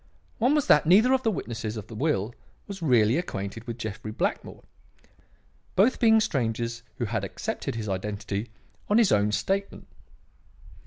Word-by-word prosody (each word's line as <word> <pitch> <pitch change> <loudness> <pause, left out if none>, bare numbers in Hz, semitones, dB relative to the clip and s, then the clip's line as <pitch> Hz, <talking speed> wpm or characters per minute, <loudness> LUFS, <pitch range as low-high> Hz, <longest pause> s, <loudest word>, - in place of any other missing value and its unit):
One 250 +6 +3
was 295 - +2
that 150 - +5
neither 215 +9 +6
of 265 - +2
the 230 - +1
witnesses 115 - -4
to 110 - -5
the 110 - -13
will 120 -4 -1 0.3
was 195 -2 -8
really 120 -5 +3
acquainted 110 - -5
with 115 -1 -5
Jeffrey 110 -1 -6
Blackmore; - - -3 1.1
both 215 +7 +3
being 225 -1 +6
strangers 115 - -1 0.2
who 120 - -1
had 110 -2 -2
accepted 100 +4 -4
his 110 -2 -4
identity 100 +2 -3 0.4
on 210 - +4
his 230 -5 +4
own 105 0 +3
statement. 195 - -2
115 Hz, 155 wpm, -26 LUFS, -, 1.1 s, neither